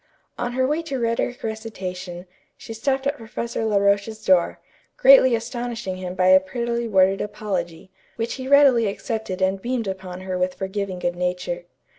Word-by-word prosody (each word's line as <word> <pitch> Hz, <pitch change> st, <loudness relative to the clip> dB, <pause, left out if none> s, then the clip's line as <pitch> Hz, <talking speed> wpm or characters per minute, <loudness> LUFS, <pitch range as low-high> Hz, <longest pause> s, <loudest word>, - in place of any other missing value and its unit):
On 245 Hz, 0 st, -3 dB
her 260 Hz, +1 st, +1 dB
way 300 Hz, +5 st, 0 dB
to 320 Hz, -5 st, -4 dB
rhetoric 235 Hz, +2 st, -1 dB
recitation, 185 Hz, -5 st, -5 dB, 0.3 s
she 225 Hz, -, -8 dB
stopped 265 Hz, +4 st, -1 dB
at 280 Hz, +1 st, 0 dB
Professor 230 Hz, 0 st, -4 dB
La 210 Hz, -2 st, +2 dB
Roche's 200 Hz, +2 st, +1 dB
door, 180 Hz, -2 st, +3 dB, 0.4 s
greatly -, -, +7 dB
astonishing 235 Hz, -4 st, -4 dB
him 185 Hz, -1 st, -5 dB
by 185 Hz, 0 st, +3 dB
a 185 Hz, 0 st, +8 dB
prettily 235 Hz, +4 st, -3 dB
worded 195 Hz, -2 st, +3 dB
apology, 195 Hz, -5 st, -4 dB, 0.2 s
which 230 Hz, 0 st, -2 dB
he 260 Hz, -1 st, -6 dB
readily 270 Hz, -5 st, +6 dB
accepted 200 Hz, -2 st, -3 dB
and 190 Hz, +1 st, +1 dB
beamed 240 Hz, -2 st, -2 dB
upon 185 Hz, -1 st, -6 dB
her 185 Hz, -1 st, -3 dB
with 180 Hz, 0 st, 0 dB
forgiving 190 Hz, -1 st, -3 dB
good 175 Hz, -1 st, -2 dB
nature. 180 Hz, -1 st, -3 dB
210 Hz, 165 wpm, -23 LUFS, 185-235 Hz, 0.4 s, a